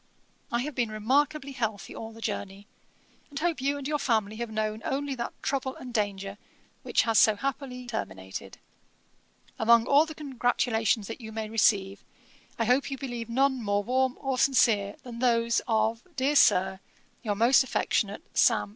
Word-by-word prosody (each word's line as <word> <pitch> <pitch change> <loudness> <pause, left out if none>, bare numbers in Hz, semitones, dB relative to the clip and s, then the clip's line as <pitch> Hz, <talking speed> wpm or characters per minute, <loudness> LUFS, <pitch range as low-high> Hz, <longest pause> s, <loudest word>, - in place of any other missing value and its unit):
'I 235 0 +1
have 300 +2 -5
been 240 -3 0
remarkably 275 +6 0
healthy 220 -6 -4
all 225 0 -7
the 225 0 -13
journey, 200 -2 -4 0.6
and 285 - -9
hope 325 -2 -1
you 280 +2 0
and 280 -1 -5
your 300 0 0
family 220 -5 0
have 235 0 -4
known 215 0 -2
only 280 +1 -2
that 240 -2 -4
trouble 265 -1 -1
and 250 -1 -9
danger 200 -2 -2 0.4
which - - +2
has 225 -2 +3
so 215 - +5
happily 255 +1 -4
terminated. 95 - -6 1.0
Among 230 +1 +5
all 290 +4 +4
the 315 - -8
congratulations 245 -6 0
that 225 +4 -7
you 220 -1 -8
may 220 -1 -5
receive, 200 -3 +2 0.5
I 230 - 0
hope 250 +5 +2
you 270 - -4
believe 240 -4 -5
none 265 +1 +2
more 205 -1 0
warm 260 +3 +1
or 270 -2 -2
sincere, 215 -7 +3
than 235 -2 -8
those 235 -2 +2
of, 225 0 +1
dear 280 +2 +1
Sir, 190 -7 +4 0.4
'Your 210 -2 -1
most 235 +6 +5
affectionate, 210 -5 -1
'SAM. 105 -1 +3
235 Hz, 165 wpm, -28 LUFS, 215-265 Hz, 1.0 s, so